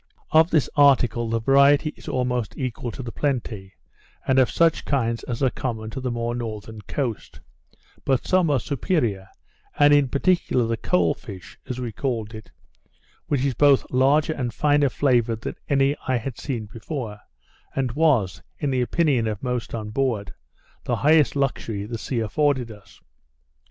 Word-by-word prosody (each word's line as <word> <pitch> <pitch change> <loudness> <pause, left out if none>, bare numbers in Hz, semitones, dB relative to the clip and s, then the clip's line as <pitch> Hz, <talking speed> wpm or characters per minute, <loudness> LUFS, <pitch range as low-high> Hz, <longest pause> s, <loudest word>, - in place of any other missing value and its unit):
Of 160 +1 +5
this 155 -5 +2
article 125 -5 +4
the 115 0 0
variety 140 +5 +4
is - - -15
almost 125 -3 -2
equal 125 -2 -4
to 130 - -7
the 120 - -6
plenty, 110 -10 -3 0.5
and 130 0 +4
of 130 - +4
such 165 -1 +2
kinds 115 -5 -1
as 125 +2 -3
are 130 - +3
common 110 -3 -4
to 130 - -5
the 130 - -2
more 120 0 -2
northern 110 -2 -6
coast; 120 +1 -4 0.6
but 135 -2 0
some 185 -3 +2
are 140 -3 +2
superior, 120 - -1 0.5
and 145 0 +6
in 145 -2 +4
particular 140 -3 +1
the 115 0 -1
cole 90 -6 +1
fish, 95 -4 -11
as 125 0 -4
we 120 -2 -4
called 115 -2 -3
it, 110 -3 -10 0.8
which 140 -2 0
is 135 - 0
both 140 +2 +4
larger 140 +5 +3
and 120 -6 -4
finer 145 -1 +3
flavoured 120 -4 +1
than - - -4 0.2
any 140 0 +3
I 130 - +2
had 120 +1 -6
seen 120 -6 -4
before, 110 0 -6 0.6
and 130 -3 0
was, 120 - +1 0.2
in 145 - -1
the 130 -1 +1
opinion 130 -3 +1
of 105 0 -4
most 125 -3 -3
on 105 -2 -5
board, 115 -5 -1 0.5
the - - -1
highest 155 0 +3
luxury 115 -7 -2
the 115 +1 -5
sea 120 +1 -2
afforded 130 +1 0
us. 105 -2 -16
125 Hz, 165 wpm, -23 LUFS, 110-140 Hz, 0.8 s, and